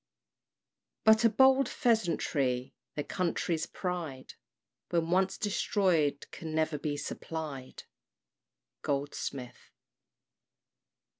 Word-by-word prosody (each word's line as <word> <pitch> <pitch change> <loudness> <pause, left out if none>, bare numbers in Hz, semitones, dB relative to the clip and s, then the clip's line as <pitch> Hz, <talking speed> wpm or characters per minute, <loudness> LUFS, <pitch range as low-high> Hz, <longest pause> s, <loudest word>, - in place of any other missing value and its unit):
But 220 +1 +6
a 230 - +7
bold 265 +2 +5
pheasantry, 150 - +1 0.2
their 145 - -1
country's 170 -2 -1
pride 170 -8 -4 0.6
When 170 -1 0
once 190 +1 +2
destroyed 185 -8 +1
can 160 -1 -6
never 155 -1 +1
be 145 0 -2
supplied. 145 -4 -6 1.0
GOLDSMITH. 140 -2 -4
165 Hz, 80 wpm, -31 LUFS, 145-195 Hz, 1.0 s, a